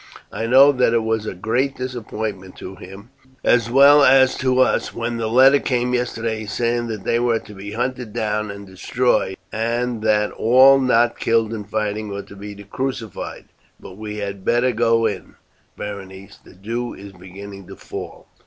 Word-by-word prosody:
I 115 - -3
know 135 +4 +7
that 125 -3 +2
it 115 - +2
was 110 -1 -1
a - - -4
great 125 +8 -1
disappointment 110 -6 -5
to 95 - -9
him, 95 +5 -12 0.3
as 120 -1 +3
well 140 +3 +7
as 130 -1 +5
to 130 -1 +1
us, 130 - +1
when 115 0 -3
the 115 -1 -2
letter 135 +4 +6
came 125 -2 -1
yesterday 115 -3 -2
saying 120 +2 -1
that 110 -4 -5
they 115 - +1
were 120 -1 +1
to 105 - -13
be 100 +1 -8
hunted 125 0 -3
down 105 -1 -2
and 100 0 -8
destroyed, 95 +1 -1 0.2
and 120 +1 -2
that 105 -1 +1
all 130 +4 +5
not 120 -2 +2
killed 115 -1 +1
in 105 -2 -6
fighting 105 0 -3
were 100 0 -5
to - - -14
be 100 +1 -9
crucified. 120 0 -5 0.3
But 90 - -12
we 105 0 -7
had 100 -2 -5
better 120 +4 +2
go 115 0 +2
in, 105 - -4 0.4
Berenice, 100 -1 -8
the - - -17
dew 115 +6 -5
is 100 0 -11
beginning 95 +1 -11
to - - -10
fall." - - -9
115 Hz, 175 wpm, -20 LUFS, 105-125 Hz, 0.4 s, know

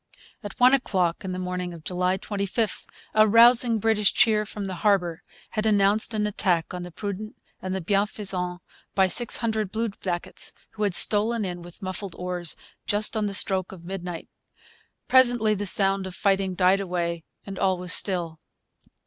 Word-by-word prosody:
At 205 - -9
one 250 +2 +6
o'clock 185 -10 0
in 190 - -5
the 180 - -4
morning 180 -1 -4
of 160 - -13
July 180 +1 -1
25 200 +2 -3 0.3
a 215 0 +5
rousing 235 +1 +5
British 215 -1 +2
cheer 215 -3 +2
from 205 -2 -6
the 190 - -4
harbour 180 -6 +1 0.3
had 215 -1 -1
announced 205 +1 +2
an 210 -1 0
attack 185 -5 -1
on 180 - -5
the 175 - -7
Prudent 205 +4 -6 0.3
and 185 0 -4
the 190 - -3
Bienfaisant 195 -2 -1 0.3
by 190 -1 +4
six 235 +5 +2
hundred 220 -4 -2
bluejackets, 200 -6 -4 0.2
who 215 - -10
had 200 -4 0
stolen 215 +2 +5
in, 175 -1 -5
with 175 +4 -13
muffled 185 -1 -5
oars, 180 -2 -2 0.3
just 210 +2 +1
on 215 -1 0
the 200 - -1
stroke 190 -1 +1
of 175 -3 -12
midnight. 180 -2 -6 0.8
Presently 245 -4 +4
the 205 0 -3
sound 195 0 +1
of 185 - -8
fighting 195 -2 0
died 185 +2 +3
away, 170 -3 -3 0.2
and 195 -1 -7
all 190 -1 +1
was 180 0 +1
still. 170 -5 +1
195 Hz, 170 wpm, -25 LUFS, 180-215 Hz, 0.8 s, one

